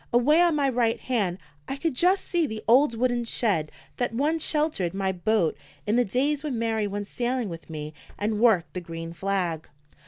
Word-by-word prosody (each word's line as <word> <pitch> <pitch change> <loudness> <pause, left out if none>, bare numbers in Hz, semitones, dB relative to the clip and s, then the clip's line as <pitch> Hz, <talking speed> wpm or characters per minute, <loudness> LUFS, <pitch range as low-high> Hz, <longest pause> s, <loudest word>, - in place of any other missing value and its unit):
Away 275 +7 +4
on 345 -3 +4
my 285 -2 +2
right 235 -3 +1
hand 205 -9 -1 0.3
I 270 - -3
could 320 +2 -1
just 365 +9 +2
see 340 -4 +1
the 220 0 -6
old 245 +1 +5
wooden 245 0 +1
shed 200 -9 0 0.3
that 245 -2 -1
once 310 +5 +1
sheltered 295 - 0
my 195 -1 0
boat 185 -1 +1 0.3
in 210 - +1
the 245 - +4
days 275 +7 0
when 285 -6 -2
Mary 225 -2 0
went 205 0 -4
sailing 240 0 -2
with 165 -1 -9
me 155 -1 -6 0.2
and 210 0 -1
worked 215 -8 +3
the 180 - -4
green 165 -1 -7
flag. 180 -4 -2
230 Hz, 190 wpm, -26 LUFS, 190-270 Hz, 0.3 s, old